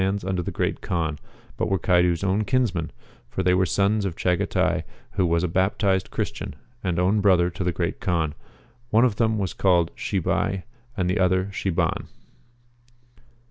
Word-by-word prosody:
who - - +3
lieki - - +2
kinds 100 - -4
under 95 -2 -1
the - - -4
(ircat - - -2
Kaan, 80 -4 -2 0.4
but - - 0
were 95 - +2
Caidu's 90 -1 +2
own 100 +2 +1
kinsmen, 105 - 0 0.4
for 95 - -2
they 90 0 +4
were 95 0 +3
sons 100 +5 +2
of 95 -4 -2
Chagatai 90 0 +1 0.3
who 95 -2 +1
was 85 0 +1
a - - +2
baptized 95 +2 +1
Christian, - - -4 0.3
and 90 -3 -1
own 95 +4 +2
brother 90 -3 +4
to 90 - -4
the 90 - +1
Great - - -2
Kaan; 80 -4 0 0.6
one 115 +2 +5
of 110 -5 0
them 110 -2 +2
was 95 -4 -2
called 90 -3 +2
Chibai, 95 0 -1 0.3
and 90 -2 +1
the 95 +3 0
other 95 +1 +2
Chiban.' 95 -3 -1
95 Hz, 180 wpm, -24 LUFS, 90-100 Hz, 0.6 s, one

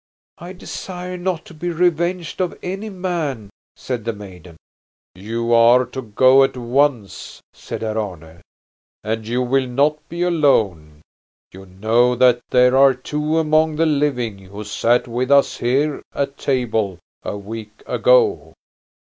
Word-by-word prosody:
"I 175 +2 -9
desire 180 0 -7
not 180 -1 -3
to - - -13
be 170 +3 -4
revenged 175 +1 -1
on 180 - -2
any 195 +4 -4
man," 165 - -4 0.2
said 125 -4 -5
the 115 - -2
maiden. 90 -5 -12 0.6
"You 115 +5 -3
are 120 +2 +5
to 130 +2 -7
go 130 +4 +4
at 135 -1 -1
once," 125 - -1
said - - -7
Herr 110 0 -2
Arne. 85 -5 -7 0.6
"And 110 0 -3
you 125 +2 0
will 130 +1 +1
not 145 +5 +1
be 170 +1 -3
alone. 100 - +1 0.5
You 95 +1 -13
know 115 +6 +1
that 125 -1 +4
there 125 0 +4
are 135 -1 +6
two 150 +5 -2
among 155 0 +2
the 165 +2 +2
living 140 -9 0
who 100 +2 -10
sat 115 +4 +1
with 125 +2 -2
us 140 0 +4
here 140 +5 0
at 140 0 -2
table 110 -9 -1 0.2
a - - -5
week 105 +1 -9
ago." - - +2
125 Hz, 145 wpm, -20 LUFS, 110-155 Hz, 0.6 s, are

